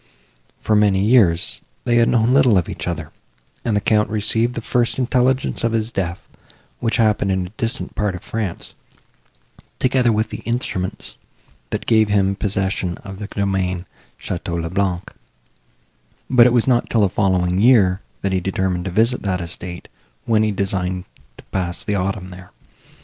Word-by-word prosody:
For 110 - +1
many 105 -2 +4
years, 100 -6 +3 0.2
they 120 - +2
had 115 0 +4
known 120 +1 +3
little 130 -6 +5
of 90 - +1
each - - -6
other, 80 -4 -4 0.5
and 110 - 0
the - - +3
Count 105 +1 +2
received 110 +3 0
the - - -2
first 120 +1 0
intelligence 130 0 +1
of 115 -1 +1
his 110 0 -1
death, 90 -6 -3 0.5
which 115 -1 0
happened 105 -3 +2
in 95 -1 0
a - - -8
distant 115 +2 -4
part 105 -3 -1
of 90 - -9
France, 110 -6 -4 1.0
together 130 -2 +2
with 110 0 0
the - - -5
instruments, 115 -6 -3 0.5
that - - -3
gave 110 -2 +3
him 100 -1 +2
possession 95 -3 -2
of 95 -1 -8
the 105 - -5
domain 95 -3 -1 0.3
Château 85 -1 -4
le 85 0 -4
Blanc; 95 -2 -1 1.2
but 125 -2 +7
it - - +3
was 120 -2 +3
not 120 -2 +2
till 115 - +2
the 100 - +5
following 90 -1 +1
year, 105 -6 +5 0.2
that 95 - 0
he 95 - +1
determined 95 -1 -1
to - - -2
visit 115 +7 +2
that 95 -3 -1
estate, 85 0 -6 0.4
when 110 -2 +3
he 110 - +2
designed 95 -2 -2 0.3
to - - -14
pass 90 -2 -2
the 105 - -2
autumn 95 -1 -2
there. 90 0 -12
100 Hz, 170 wpm, -20 LUFS, 90-115 Hz, 1.2 s, but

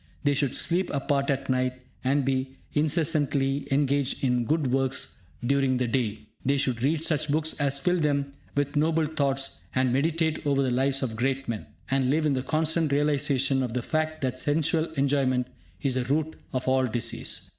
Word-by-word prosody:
They 145 -1 +3
should 140 -2 0
sleep 180 +2 0
apart 140 0 0
at 140 -1 -1
night, 130 -1 +1 0.3
and 135 +1 +2
be 130 0 -1 0.2
incessantly 145 -3 +1
engaged 140 -1 +1
in 125 -2 +2
good 150 -2 +1
works 135 -1 0 0.3
during 135 0 +2
the 125 - 0
day. 115 -3 -1 0.2
They 140 +2 +2
should 130 -4 0
read 155 +4 +1
such 155 -2 +1
books 155 +2 +1
as 140 -1 +1
fill 180 +6 +1
them 140 -2 0 0.2
with 145 0 -1
noble 160 +2 +2
thoughts 140 -3 0
and 130 -1 +2
meditate 160 +3 +1
over 140 -2 +2
the 130 - 0
lives 135 +2 +1
of 115 -4 -2
great 135 +3 -1
men, 115 -3 -4 0.2
and 135 -1 +2
live 155 +3 +2
in 150 - +2
the 130 - 0
constant 160 +2 +1
realisation 140 -2 +2
of 125 -2 -3
the 125 - -1
fact 155 +1 -1
that 130 -1 -2
sensual 160 +3 +1
enjoyment 135 -2 +1 0.4
is 135 - +2
the 130 0 0
root 155 +4 0 0.2
of 130 -1 -3
all 130 0 +3
disease. 115 0 -1
140 Hz, 180 wpm, -27 LUFS, 130-150 Hz, 0.4 s, They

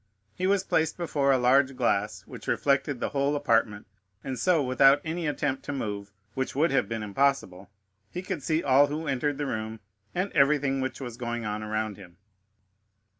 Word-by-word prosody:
He 185 - -1
was 200 0 +2
placed 160 -4 0
before 145 -5 +1
a 135 - +4
large 130 +2 +3
glass, 105 -4 0
which - - -11
reflected 140 -1 +1
the - - -2
whole 140 +1 0
apartment, 115 -7 +1 0.4
and 130 -2 -4
so, 175 -5 +3
without 135 +2 +5
any 165 0 -2
attempt 145 -2 -2
to - - -3
move, 100 -6 -4 0.2
which 130 -1 -3
would 155 +5 +2
have 135 - +1
been 115 -1 -3
impossible, 105 -4 0 0.4
he 180 - -6
could 185 -4 -4
see 160 +3 0
all 140 +1 +5
who 155 +2 -4
entered 140 +1 -1
the 145 - -2
room 110 -3 -4 0.4
and 185 +3 -1
everything 140 -1 +2
which 130 - -3
was 120 -4 -7
going 120 -2 -4
on 105 0 -3
around 110 -1 -3
him. 90 -3 -14
135 Hz, 180 wpm, -27 LUFS, 115-145 Hz, 0.4 s, without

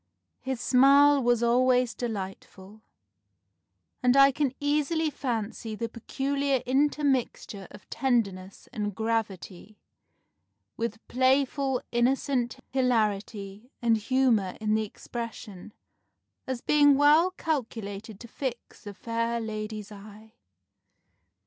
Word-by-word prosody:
His 265 -2 -4
smile 280 +3 +5
was 240 -1 +2
always 250 +1 +3
delightful; 200 -2 -7 1.2
and 250 +1 +3
I 275 0 +7
can 280 -1 0
easily 300 +2 0
fancy 225 -4 -4
the 230 +1 -4
peculiar 275 +3 -2
intermixture 265 -7 0
of 205 - -15
tenderness 200 -8 -2
and 205 -4 -3
gravity, 215 -2 -3 1.0
with 230 -1 -5
playful 265 +1 +1
innocent 245 0 0
hilarity 215 -3 -1
and 235 -2 +3
humour 225 -4 +1
in 215 -1 0
the 220 0 +1
expression, 215 -3 -8 0.8
as 260 -2 -3
being 290 -1 +5
well 300 +5 +5
calculated 220 - -4
to 235 - -9
fix 240 -3 -7
a 205 - -7
fair 230 +2 -2
lady's 215 -1 -6
eye. 210 +2 -13
235 Hz, 100 wpm, -27 LUFS, 215-270 Hz, 1.2 s, I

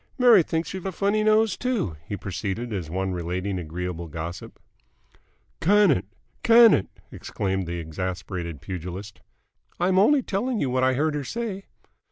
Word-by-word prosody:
Mary 245 -6 +7
thinks 165 +2 -2
you've 190 0 -5
a - - -2
funny 205 +4 +1
nose, 215 -1 +3
too," 235 - -2
he 100 - -4
proceeded, 100 +6 -4
as 90 -6 -4
one 95 +3 -2
relating 90 +2 -3
agreeable 85 +1 -5
gossip. 80 +3 -7 1.0
"Can 205 0 +5
it! 90 - 0 0.4
Can 230 -1 +7
it!" 95 - +1 0.2
exclaimed 95 -2 -3
the 85 +1 -3
exasperated 85 -1 -5
pugilist. 95 +3 -7 0.6
"I'm 185 +2 +3
only 265 +7 +4
telling 230 +4 -1
you 130 - 0
what 130 0 +1
I 130 0 +3
heard 155 +3 +1
her 145 -1 -2
say." 200 - -4
105 Hz, 155 wpm, -25 LUFS, -, 1.0 s, Mary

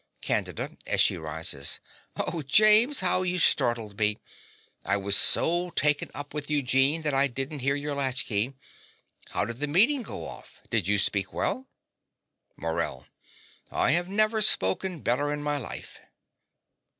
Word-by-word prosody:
CANDIDA - - -2
(as - - +1
she - - +4
rises). 80 -3 -2 0.4
Oh, 165 - -3
James, 215 - +5
how 185 0 +2
you 180 0 -1
startled 115 - +1
me! 105 0 +2 0.7
I 100 +3 0
was 100 0 0
so 175 +9 +3
taken 145 0 +2
up 145 +1 -8
with 150 -1 -5
Eugene 140 +2 +1
that 150 -2 0
I 135 +1 +3
didn't 135 +3 -5
hear 135 +2 0
your 145 0 -4
latch 135 -2 -1
key. 115 +5 -1 0.7
How - - -1
did 115 +1 -6
the 150 - -2
meeting 230 - +3
go 230 - -7
off? 65 -1 -13
Did - - 0
you 105 0 +2
speak 100 0 0
well? 260 +1 -2 0.9
MORELL. 80 -5 -4 0.6
I - - +1
have 175 +3 +3
never 215 +2 +1
spoken 175 - +2
better 145 +5 0
in 150 0 -4
my 145 0 0
life. 125 - -8
145 Hz, 150 wpm, -26 LUFS, 110-175 Hz, 0.9 s, James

